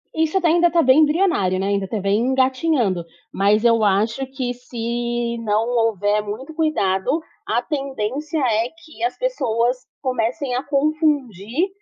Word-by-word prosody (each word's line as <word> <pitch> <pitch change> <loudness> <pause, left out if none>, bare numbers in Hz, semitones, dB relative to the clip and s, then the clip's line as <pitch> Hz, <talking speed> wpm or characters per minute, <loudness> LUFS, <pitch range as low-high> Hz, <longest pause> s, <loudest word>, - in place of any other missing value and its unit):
Isso 320 +3 +1
até 350 - +1
ainda 345 +2 +4
está 335 0 +3
bem 260 +3 +5
embrionário, 300 - +2
né, 195 - -1
ainda 200 -1 0
tá 215 0 -3
bem 200 +2 +1
engatinhando, 255 - +1 0.3
mas 205 +3 +2
eu 230 -2 +4
acho 215 +6 +1
que 260 -2 -3
se 240 -1 -3
não 215 +1 +1 0.2
houver 210 -1 0
muito 220 +8 -6
cuidado, 280 - 0 0.3
a 235 +3 +1
tendência 275 +2 -3
é 230 -2 +1
que 315 +2 -10
as 360 - 0
pessoas 250 - 0 0.2
comecem 255 +1 -1
a 255 - -1
confundir 285 - 0
245 Hz, 145 wpm, -21 LUFS, 215-300 Hz, 0.3 s, bem